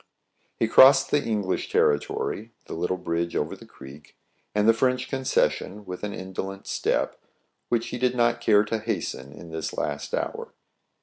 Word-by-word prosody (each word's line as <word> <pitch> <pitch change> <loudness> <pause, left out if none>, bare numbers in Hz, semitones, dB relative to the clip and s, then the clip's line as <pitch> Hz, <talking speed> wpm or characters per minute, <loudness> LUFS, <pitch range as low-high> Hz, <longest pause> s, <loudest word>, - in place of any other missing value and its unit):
He 115 - +2
crossed 130 +4 +7
the 145 -1 +2
English 105 -5 -1
territory, 105 +9 0
the - - -7
little 90 +2 -1
bridge 85 -1 -2
over - - -1
the - - -15
creek, 70 +2 -14 0.4
and 105 +1 +3
the 115 - +7
French 125 +2 +1
concession, 130 -6 0
with 90 -1 -7
an 105 - -2
indolent 95 0 -6
step, - - -1 0.5
which 115 -1 0
he 125 - -5
did 125 0 +1
not 120 -1 +2
care 105 -1 +5
to 110 +1 -2
hasten 70 -9 -4
in 80 +3 -11
this 80 -1 -4
last - - -2
hour. - - -4
105 Hz, 165 wpm, -25 LUFS, 90-120 Hz, 0.5 s, crossed